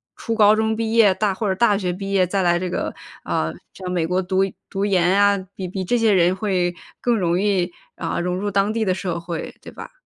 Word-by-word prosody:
初 230 - -4
高 215 -1 +5
中 220 0 0
毕 225 0 -2
业 220 -4 +6
大 200 +1 0
或 205 +2 -2
者 190 - +1
大 205 0 +3
学 185 -3 -1
毕 195 +2 -5
业 190 -2 +4
再 195 +2 -1
来 175 -1 +3
这 180 +1 -3
个， - - -3 0.3
啊， 80 +1 -1 0.2
在 185 -1 -7
美 170 -3 0
国 180 +2 +1
读 185 +1 0 0.3
读 195 +1 -1
研 180 -3 +2
呀， 200 0 +3
比 190 - -5
比 190 +1 -4
这 240 +7 +1
些 225 -3 +3
人 180 -1 +4
会 185 -3 0 0.3
更 240 -2 +2
容 175 -2 +1
易， 195 -3 +1 0.3
啊， - - -3
融 180 +1 -1
入 205 +2 -2
当 200 +1 +1
地 220 -1 -1
的 185 - +2
社 180 -2 -3
会， 170 -1 -6
对 - - -10
吧？ - - -9
190 Hz, 255 characters per minute, -21 LUFS, 180-205 Hz, 0.3 s, 业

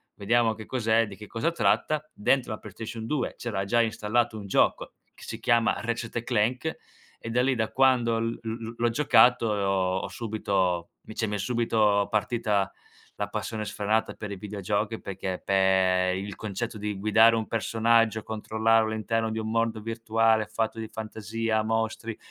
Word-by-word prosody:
vediamo 115 +2 +2
che 110 0 -10
cos'è, 115 -2 +1
di 100 -2 -10
che 105 0 -10
cosa 135 +9 -1
tratta." 150 +4 +1
Dentro 125 +3 +1
la - - -5
PlayStation 110 +2 -7
2 135 +1 -2
c'era 100 -5 -3
già 120 +3 +3
installato 110 0 0
un 100 - -8
gioco, - - +1 0.2
che - - -16
si - - -6
chiama 115 -1 +3
Ratchet& 115 0 -3
Clank, 125 +6 0 0.4
e 115 - -7
da 125 - +2
lì 130 +1 +2
da 110 -1 -1
quando 125 -4 +3
l 115 0 -2
l 115 - -5
l 115 0 -5
l'ho 120 0 +2
giocato 120 -3 +4
e 100 - -1
ho 95 -1 +1
ho - - -4
subito 95 -6 -1
vice 110 0 -3
m'è 105 0 -2
subito 105 -2 +2
partita 105 -2 0 0.5
la 105 - -2
passione 110 +1 -4
sfrenata 110 +2 -1
per 105 -2 -7
i - - -4
videogiochi 105 +2 -2
perché 95 -1 -5
pe 95 -1 +3
il 100 0 -5
concetto 110 +2 -4
di 105 -1 -4
guidare 110 +2 +5
un 110 - -2
personaggio, 115 -1 +2
controllarlo 110 0 +1
all'interno 110 0 -1
di 110 - -2
un 110 0 -3
mondo 115 0 0
virtuale 115 -1 +1
fatto 110 +1 -2
di 110 -1 -5
fantasia, 110 0 -2
mostri, 110 0 -2
110 Hz, 170 wpm, -27 LUFS, 105-115 Hz, 0.5 s, guidare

